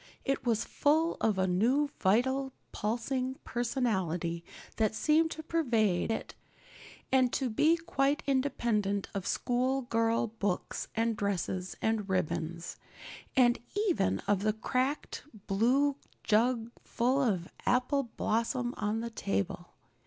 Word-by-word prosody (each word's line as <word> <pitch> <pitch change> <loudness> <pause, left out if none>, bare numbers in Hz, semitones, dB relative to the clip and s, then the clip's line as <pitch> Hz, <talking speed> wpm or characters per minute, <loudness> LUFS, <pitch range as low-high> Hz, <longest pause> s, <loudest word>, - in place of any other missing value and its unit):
It 275 -2 -1
was 230 -1 +2
full 315 +3 +2
of 215 -3 +2
a 190 - +2
new 240 +11 +2
vital, 260 +7 +2 0.2
pulsing 255 +4 -2
personality 190 - -1 0.3
that 220 -1 +1
seemed 315 +5 +3
to 315 - -6
pervade 230 - +1
it 225 - -3 0.8
and 260 -2 +4
to 260 -4 0
be 315 +9 +4
quite 285 -3 0
independent 235 -7 0
of 195 -1 -3
schoolgirl 240 -3 +1
books 195 -3 -2
and 225 0 +1
dresses 190 -2 -2
and 220 -3 0
ribbons, 170 -1 -2 0.6
and 240 -2 +5 0.3
even 95 - +2
of 200 0 +1
the 215 +1 +2
cracked 255 +6 -1 0.2
blue 255 +8 +2 0.3
jug 230 +1 +2
full 255 +4 +1
of 190 -9 0 0.2
apple 255 +1 +2
blossoms 240 +2 0
on 210 +2 -1
the 235 0 -4
table. 100 - -2
230 Hz, 120 wpm, -31 LUFS, 200-265 Hz, 0.8 s, and